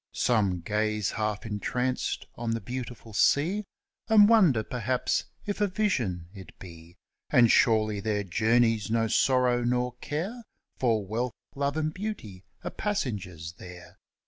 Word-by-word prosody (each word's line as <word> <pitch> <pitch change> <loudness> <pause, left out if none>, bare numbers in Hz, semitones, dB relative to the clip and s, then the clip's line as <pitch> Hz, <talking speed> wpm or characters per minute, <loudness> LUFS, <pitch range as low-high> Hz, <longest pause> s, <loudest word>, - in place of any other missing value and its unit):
Some 100 -7 +1
gaze 105 +2 -1
half 105 -1 -2
entranced 125 +4 -2
on 120 -1 -4
the - - -2
beautiful 120 -2 -7
sea, 170 - +2 0.4
And 210 -2 +7
wonder 180 - +5
perhaps 125 +2 -1 0.2
if 205 0 -3
a 205 - +4
vision 125 - -1
it 95 -2 -12
be: 85 -2 -12 0.3
And 120 -2 +5
surely 110 -3 +3
their 105 0 -1
journeys 115 +3 +2
no 115 0 +2
sorrow 125 +1 +2
nor 125 0 0
care, 190 +12 -4 0.4
For 115 -5 +1
wealth, 115 +5 -2 0.2
love, 140 +2 -1
and 155 0 -1
beauty 170 - -6 0.2
are - - -4
passengers 100 - -3
there. 90 -1 -12
115 Hz, 135 wpm, -28 LUFS, 105-135 Hz, 0.4 s, And